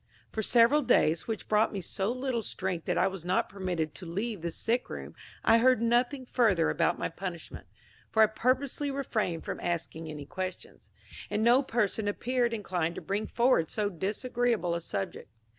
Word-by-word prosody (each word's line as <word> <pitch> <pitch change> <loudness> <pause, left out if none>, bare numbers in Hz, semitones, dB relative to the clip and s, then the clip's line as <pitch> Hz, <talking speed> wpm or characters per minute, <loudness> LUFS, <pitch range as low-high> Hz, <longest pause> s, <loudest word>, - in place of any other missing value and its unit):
For 220 - -2
several 235 +7 +5
days, 160 - +2
which 225 -1 -4
brought 215 +1 +3
me 200 - -3
so 195 +3 -1
little 255 -1 -2
strength 185 -5 -3
that - - 0
I - - +4
was 190 -3 -3
not 180 +2 +1
permitted 180 -5 -3
to 185 - -8
leave 200 +3 -3
the 170 - -2
sick 230 +8 -1
room, - - -7 0.3
I 225 +1 +6
heard 255 0 +5
nothing 245 +3 +1
further 210 -10 +2
about - - +1
my - - -1
punishment, 175 -1 -7 0.4
for 220 - +5
I - - +9
purposely 255 +6 0
refrained 220 -11 -2
from - - -4
asking 165 -2 -3
any 150 -2 -7
questions, 185 +3 -7 0.4
and 210 +1 0
no 240 +3 +6
person 220 -5 0
appeared 240 +3 0
inclined 180 -6 -2
to - - -6
bring 200 +2 -2
forward 235 -10 +2
so 210 -2 -1
disagreeable 215 +1 -1
a 170 - -2
subject. 180 - -4
210 Hz, 175 wpm, -29 LUFS, 180-240 Hz, 0.4 s, I